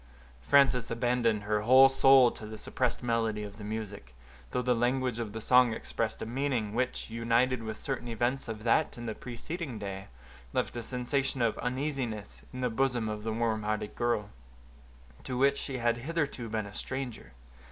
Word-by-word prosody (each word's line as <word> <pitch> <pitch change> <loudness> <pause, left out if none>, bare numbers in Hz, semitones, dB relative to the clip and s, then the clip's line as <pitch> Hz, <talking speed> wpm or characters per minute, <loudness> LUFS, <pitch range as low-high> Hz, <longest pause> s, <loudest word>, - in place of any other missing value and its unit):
Frances 125 - +4
abandoned 115 -2 +1
her 105 0 0
whole 130 +4 +8
soul 135 -2 +6
to 110 - -8
the 110 0 -7
suppressed 125 +3 -2
melody 115 -3 0
of 105 0 -8
the 105 - -9
music, 105 - -6 0.3
though 125 - -1
the 125 0 +3
language 125 0 0
of 115 -3 -3
the 110 - -5
song 125 0 +5
expressed 110 0 -3
a - - -3
meaning, 120 -3 -1
which, 125 -1 -2
united 115 +2 +2
with 110 -1 -5
certain 135 -3 -4
events 120 +4 -1
of 110 -1 -6
that 120 +6 +2
and 120 0 -6
the 110 - -2
preceding 125 +4 -6
day, 95 -2 -6 0.5
left - - -1
a 120 - -3
sensation 130 +3 -1
of 115 - +2
uneasiness 125 -5 -3
in 130 - -6
the 125 - +1
bosom 120 -1 +1
of 105 -1 -3
the 110 +1 -3
warm 110 -1 0
hearted 105 0 -2
girl, 120 -4 -1 0.9
to 125 - -4
which 140 +2 +3
she 135 -2 -4
had 120 -1 +1
hitherto 140 -3 -2
been 110 -1 -2
a 100 - -10
stranger. 125 - -5
120 Hz, 180 wpm, -30 LUFS, 110-130 Hz, 0.9 s, whole